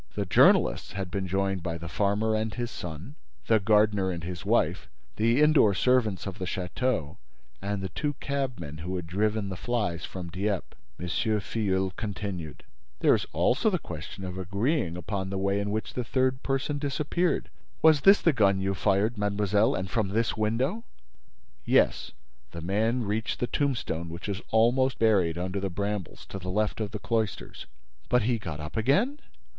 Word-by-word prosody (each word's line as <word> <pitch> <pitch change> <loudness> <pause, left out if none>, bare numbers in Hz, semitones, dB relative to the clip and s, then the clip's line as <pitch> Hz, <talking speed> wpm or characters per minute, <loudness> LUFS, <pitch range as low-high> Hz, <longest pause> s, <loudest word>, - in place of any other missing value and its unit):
The 100 - -1
journalists 90 - +4
had 95 -2 -4
been 95 -2 -2
joined 95 0 0
by 85 -1 -3
the 85 0 -7
farmer 100 +5 +1
and 110 0 0
his 120 +1 -4
son, 90 - -7 0.3
the 110 -1 +4
gardener 105 -1 +3
and 85 -3 -4
his 85 -1 -5
wife, - - +1 0.3
the 115 +4 +3
indoor 150 -10 +5
servants 110 -1 +2
of 100 0 -6
the 95 - -2
château 90 - -2 0.4
and 100 0 -3
the 95 - -3
two 145 - -2
cabmen 125 - -4
who 90 +4 -4
had 90 -2 -3
driven 105 +3 0
the 95 - -4
flies 105 -5 -2
from 90 -2 -6
Dieppe. 100 +2 -2 0.2
M. 90 - -4
Filleul 95 0 0
continued: 100 -7 -5 0.4
"There - - +6
is - - 0
also 185 - +2
the 185 - +1
question 95 - -8
of 90 0 -5
agreeing 100 - 0
upon 95 +1 -3
the 95 - -3
way 100 +1 +1
in 100 0 -2
which 110 +1 -3
the 125 - -2
third 130 +2 0
person 135 +2 -1
disappeared. 150 +5 -1 0.3
Was 155 -3 +6
this 195 +4 +6
the 165 - +4
gun 100 -6 +3
you 95 0 0
fired, 105 +4 +1
mademoiselle, 105 +1 +2
and 95 - -3
from 110 +1 0
this 110 +4 0
window?" 125 - 0 0.8
"Yes. - - +2 0.4
The 85 - -6
man 110 +8 +1
reached 110 +2 -2
the - - +1
tombstone 120 - -1
which 85 +4 -7
is 100 -2 -3
almost 120 +3 +3
buried 95 -7 +3
under 90 +2 -2
the 95 0 -2
brambles, 100 -1 -4
to 95 - -5
the 90 0 -6
left 105 +3 0
of 105 - -2
the 105 - -5
cloisters." 110 -1 -3 0.4
"But 125 -2 +3
he 120 +1 +1
got 80 -7 -6
up 75 0 -7
again?" 195 - +2
105 Hz, 175 wpm, -28 LUFS, 95-115 Hz, 0.8 s, There